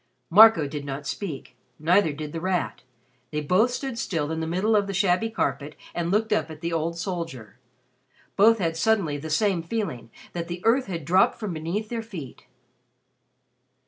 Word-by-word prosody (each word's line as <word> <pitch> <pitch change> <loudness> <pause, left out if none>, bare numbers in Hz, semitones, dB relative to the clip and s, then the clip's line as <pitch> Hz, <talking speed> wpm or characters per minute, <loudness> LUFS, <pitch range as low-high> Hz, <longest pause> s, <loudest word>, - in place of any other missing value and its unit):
Marco 205 -5 +8
did 145 0 -5
not 140 +1 -5
speak; 155 -7 -5 0.2
neither 170 +2 +3
did 150 0 -7
The 165 - -4
Rat. 185 -1 -1 0.5
They 150 - -2
both 185 +11 +3
stood 250 -1 -4
still 160 -8 -2
in 160 - -2
the 160 - -2
middle 190 +6 +1
of 205 -1 +2
the 195 - -4
shabby 195 +3 +2
carpet 145 -7 -2 0.2
and 170 -1 -2
looked 215 +3 +1
up 210 - 0
at 155 -1 -10
the 170 0 -2
old 165 +1 -1
soldier. 165 - -5 0.8
Both 225 +3 +6
had 165 -5 -1
suddenly 170 -6 +1
the 160 +2 -7
same 185 +2 +1
feeling 165 - -4 0.2
that 170 -1 -4
the 175 +1 -6
earth 250 +4 +3
had 165 -6 -5
dropped 185 +5 +3
from 210 -6 -4
beneath 170 +7 -3
their 235 -1 -3
feet. 180 - -9
170 Hz, 175 wpm, -25 LUFS, 155-210 Hz, 0.8 s, Marco